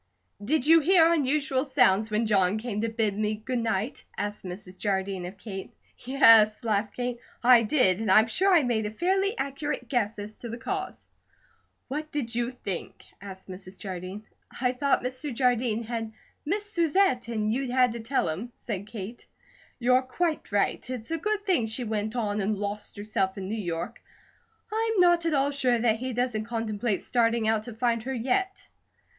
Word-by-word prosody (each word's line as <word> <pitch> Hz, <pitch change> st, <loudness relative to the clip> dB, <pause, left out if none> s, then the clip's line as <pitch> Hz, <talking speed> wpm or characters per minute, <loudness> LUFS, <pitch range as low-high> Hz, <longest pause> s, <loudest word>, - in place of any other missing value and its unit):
"Did 275 Hz, +4 st, +1 dB
you 325 Hz, +2 st, +7 dB
hear 335 Hz, +1 st, +5 dB
unusual 280 Hz, -3 st, +1 dB
sounds 225 Hz, -7 st, +3 dB
when 215 Hz, +2 st, +1 dB
John 200 Hz, -2 st, +2 dB
came 215 Hz, -2 st, -3 dB
to 230 Hz, -, 0 dB
bid 220 Hz, -3 st, 0 dB
me 215 Hz, +1 st, 0 dB
good 245 Hz, +4 st, -3 dB
night?" 225 Hz, +1 st, -2 dB
asked 205 Hz, 0 st, -4 dB
Mrs. 185 Hz, 0 st, -8 dB
Jardine 190 Hz, -2 st, -2 dB
of 190 Hz, +2 st, -10 dB
Kate. 195 Hz, -3 st, -7 dB, 0.3 s
"Yes," 230 Hz, -5 st, +5 dB
laughed 210 Hz, -2 st, 0 dB
Kate, 245 Hz, -1 st, -3 dB, 0.2 s
"I 245 Hz, -1 st, +7 dB
did. 215 Hz, -5 st, +3 dB
And 220 Hz, -2 st, -2 dB
I'm 215 Hz, +3 st, +7 dB
sure 370 Hz, -, +2 dB
I 340 Hz, -5 st, +5 dB
made 225 Hz, -4 st, 0 dB
a -, -, -3 dB
fairly 385 Hz, -, 0 dB
accurate 280 Hz, +2 st, -3 dB
guess 225 Hz, -5 st, 0 dB
as 210 Hz, +1 st, -8 dB
to 235 Hz, -, -7 dB
the 230 Hz, -, -5 dB
cause." 380 Hz, +10 st, -5 dB, 0.8 s
"What 305 Hz, +3 st, -4 dB
did 250 Hz, -6 st, -3 dB
you 240 Hz, 0 st, 0 dB
think?" 200 Hz, -8 st, -6 dB, 0.2 s
asked 190 Hz, -1 st, -10 dB
Mrs. 185 Hz, 0 st, -9 dB
Jardine. 190 Hz, +1 st, -6 dB, 0.4 s
"I 250 Hz, 0 st, +2 dB
thought 275 Hz, +1 st, +1 dB
Mr. 255 Hz, +3 st, -3 dB
Jardine 245 Hz, -2 st, +1 dB
had 225 Hz, -1 st, -4 dB, 0.4 s
missed 415 Hz, +4 st, -2 dB
Susette, 335 Hz, -, +2 dB
and 215 Hz, -2 st, -1 dB
you'd 265 Hz, +1 st, -2 dB
had 250 Hz, -1 st, +3 dB
to 235 Hz, -, -6 dB
tell 230 Hz, +5 st, 0 dB
him," 195 Hz, +10 st, -4 dB
said 200 Hz, -3 st, -5 dB
Kate. 220 Hz, +1 st, -8 dB, 0.5 s
"You're 250 Hz, +1 st, +3 dB
quite 310 Hz, +4 st, -2 dB
right. 205 Hz, +4 st, 0 dB
It's 250 Hz, +1 st, -5 dB
a 330 Hz, -, 0 dB
good 425 Hz, +3 st, -1 dB
thing 315 Hz, -, +2 dB
she 225 Hz, +3 st, -3 dB
went 215 Hz, 0 st, -2 dB
on 210 Hz, -3 st, -1 dB
and 205 Hz, +2 st, 0 dB
lost 205 Hz, +1 st, -5 dB
herself 205 Hz, -2 st, -1 dB
in 190 Hz, -1 st, -5 dB
New 205 Hz, -, -3 dB
York. 170 Hz, +6 st, -4 dB, 0.7 s
I'm 445 Hz, -1 st, 0 dB
not 345 Hz, -1 st, +4 dB
at 315 Hz, -, +1 dB
all 275 Hz, +1 st, +2 dB
sure 255 Hz, -4 st, +2 dB
that 225 Hz, -1 st, +2 dB
he 255 Hz, +1 st, -3 dB
doesn't 245 Hz, -3 st, -1 dB
contemplate 225 Hz, -2 st, -2 dB
starting 230 Hz, -2 st, +1 dB
out 220 Hz, -1 st, +2 dB
to 225 Hz, -, -9 dB
find 230 Hz, 0 st, +1 dB
her 265 Hz, +4 st, -4 dB
yet." 325 Hz, +12 st, -1 dB
235 Hz, 185 wpm, -27 LUFS, 210-270 Hz, 0.8 s, you